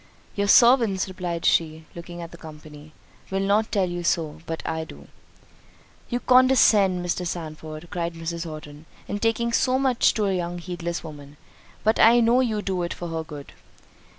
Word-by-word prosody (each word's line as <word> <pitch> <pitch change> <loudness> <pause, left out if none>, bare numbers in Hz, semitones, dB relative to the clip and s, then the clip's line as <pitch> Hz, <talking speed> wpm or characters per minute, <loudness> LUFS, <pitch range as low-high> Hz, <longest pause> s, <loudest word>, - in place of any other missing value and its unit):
"Your 200 0 -1
servants," 230 -5 +5
replied 180 -3 -5
she, 160 -1 +1
looking 175 0 -8
at 165 - -9
the - - -11
company, 155 -1 -12 0.4
"will 195 - -1
not 205 +3 +1
tell 195 -4 +1
you 175 0 -4
so; 160 -3 -1
but 165 0 -5
I 160 0 -2
do." 160 - -13 1.0
"You 245 - -1
condescend, 220 -8 +4
Mr. 175 +1 -2
Sandford," 155 -1 -7
cried 170 -1 -3
Mrs. 165 0 -4
Horton, 155 -1 -10 0.2
"in 205 - -3
talking 230 +1 0
so 255 +2 +2
much 260 -3 +2
to 215 - 0
a 195 - +1
young 175 -1 -3
heedless 175 -1 -5
woman; 145 -2 -11 0.5
but 220 +1 +2
I 235 +2 +7
know 235 +2 +4
you 220 -5 0
do 185 -2 -2
it 170 - -3
for 175 - -6
her 165 0 -3
good." 150 -3 -10
175 Hz, 175 wpm, -24 LUFS, 160-210 Hz, 1.0 s, I